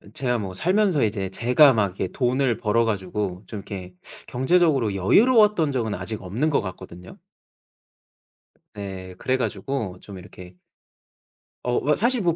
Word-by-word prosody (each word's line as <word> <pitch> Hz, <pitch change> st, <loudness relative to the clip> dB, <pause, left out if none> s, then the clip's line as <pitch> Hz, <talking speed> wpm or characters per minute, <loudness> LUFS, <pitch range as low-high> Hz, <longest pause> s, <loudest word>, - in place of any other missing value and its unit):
제가 125 Hz, -2 st, 0 dB
뭐 95 Hz, -3 st, -5 dB
살면서 185 Hz, -, +2 dB
이제 100 Hz, -3 st, -1 dB
제가 125 Hz, +8 st, +5 dB
막 110 Hz, -3 st, +2 dB
이렇게 95 Hz, 0 st, -4 dB
돈을 125 Hz, +1 st, 0 dB
벌어 115 Hz, +2 st, +1 dB
가지고 95 Hz, -2 st, -3 dB
좀 110 Hz, -, -7 dB
이렇게 95 Hz, -2 st, -8 dB, 0.3 s
경제적으로 130 Hz, -, +2 dB
여유로웠던 210 Hz, -, +4 dB
적은 115 Hz, -5 st, -1 dB
아직 105 Hz, +4 st, -5 dB
없는 115 Hz, -, -1 dB
것 145 Hz, -, +1 dB
같거든요. 90 Hz, -2 st, -9 dB, 1.6 s
네 95 Hz, -2 st, -7 dB
그래 130 Hz, +6 st, 0 dB
가지고 125 Hz, -7 st, -3 dB
좀 100 Hz, -2 st, -10 dB
이렇게 90 Hz, -1 st, -12 dB, 1.1 s
어 125 Hz, 0 st, +1 dB
뭐 150 Hz, +2 st, +1 dB
사실 240 Hz, +2 st, +1 dB
뭐 170 Hz, -3 st, +1 dB
115 Hz, 295 characters per minute, -23 LUFS, 95-140 Hz, 1.6 s, 제가